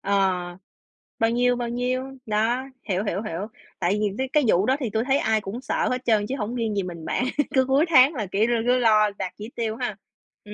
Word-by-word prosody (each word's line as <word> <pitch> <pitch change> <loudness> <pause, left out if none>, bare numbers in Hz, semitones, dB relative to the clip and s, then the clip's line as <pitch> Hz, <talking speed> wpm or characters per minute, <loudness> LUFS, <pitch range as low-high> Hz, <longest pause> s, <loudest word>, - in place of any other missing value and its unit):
ờ, 185 -3 0 0.6
bao 225 0 +3
nhiêu, 245 +1 +2
bao 240 -1 -3
nhiêu, 250 +2 -1 0.2
đó, 225 +4 0 0.3
hiểu, 190 +2 0
hiểu, 200 -1 -2
hiểu. 205 -2 -4 0.3
Tại 185 +3 +1
vì 210 -1 0
mấy 265 0 -2
cái 300 -2 +4
vụ 195 -1 +3
đó 260 - +3
thì 245 -5 -2
tui 220 +2 0
thấy 270 +1 +2
ai 220 -4 +1
cũng 205 +5 -6
sợ - - -1
hết 255 0 -3
trơn 215 -3 +3
chứ 270 - -1
hổng 225 +2 -3
riêng 225 -3 -1
gì 200 - 0
mình 170 -3 -7
bạn, - - -1 0.3
cứ 260 -1 +4
cuối 270 +4 +3
tháng 270 -1 +6
là 215 - -2
kiểu 205 +3 +2
l 240 - 0 0.2
cứ 250 - +4
lo 215 -3 +4
đạt 185 -2 -4
chỉ 215 +2 -7
tiêu 225 -2 -2
ha, 240 -4 -3 0.5
ừm. 210 - -9
220 Hz, 240 wpm, -24 LUFS, 205-250 Hz, 0.6 s, tháng